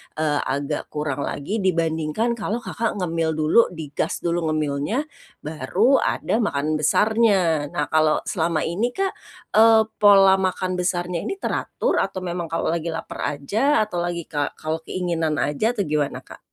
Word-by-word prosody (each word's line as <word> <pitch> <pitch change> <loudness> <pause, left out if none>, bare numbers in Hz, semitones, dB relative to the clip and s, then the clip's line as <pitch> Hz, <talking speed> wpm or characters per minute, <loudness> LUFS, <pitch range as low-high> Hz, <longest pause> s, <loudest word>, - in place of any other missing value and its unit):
eee, 150 -2 0
agak 140 +1 -2
kurang 150 -2 -3
lagi, 200 +11 -3
dibandingkan 165 +3 0
kalau 225 +2 -3
Kakak 230 0 -2
ngemil 165 -3 -1
dulu, 155 +9 +4
digas 150 -3 -4
dulu 170 -1 0
ngemilnya, 155 - -1 0.4
baru 175 - +2
ada 225 - 0
makan 155 -7 0
besarnya. 190 -3 +2
Nah, 150 - -2
kalau 155 -1 +3
selama 165 -3 -1
ini 215 +9 -1
Kak, 390 0 0 0.4
eee, 220 0 +6 0.2
pola 195 -2 +6
makan 185 -1 -1
besarnya 175 -1 -1
ini - - -2
teratur, 475 +4 -1
atau 190 -1 -2
memang 175 -1 -3
kalau 165 0 -1
lagi 170 0 -2
laper 165 - -6 0.2
aja, 220 - +1
atau 205 -5 -4
lagi 175 -1 -3
ka 145 -2 -3
kalau 160 +1 -3
keinginan 165 -3 -1
aja, 215 - 0
atau 205 - 0
gimana 150 -3 -2
Kak? - - -13
170 Hz, 150 wpm, -22 LUFS, 155-205 Hz, 0.4 s, eee